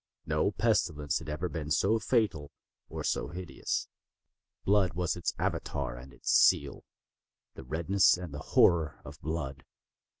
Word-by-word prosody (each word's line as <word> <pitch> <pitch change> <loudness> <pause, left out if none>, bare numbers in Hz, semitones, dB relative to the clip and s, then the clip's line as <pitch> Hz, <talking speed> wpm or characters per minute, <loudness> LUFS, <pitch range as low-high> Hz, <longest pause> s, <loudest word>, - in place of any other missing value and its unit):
No 75 +4 +1
pestilence 85 -10 0
had 80 -2 -9
ever 75 +4 -2
been 80 -3 -5
so 100 +8 +2
fatal, 105 - 0 0.4
or - - -5
so - - -1
hideous. 90 +3 -4 0.8
Blood 95 -3 +3
was 90 0 0
its 85 -1 -2
Avatar 65 -3 -2
and 65 +2 -11
its 65 - -3
seal—the - - 0
redness 85 +8 +3
and 90 -4 -7
the 75 - -5 0.2
horror 80 -3 +4
of - - -11
blood. 75 -4 -4
80 Hz, 135 wpm, -30 LUFS, 75-90 Hz, 0.8 s, horror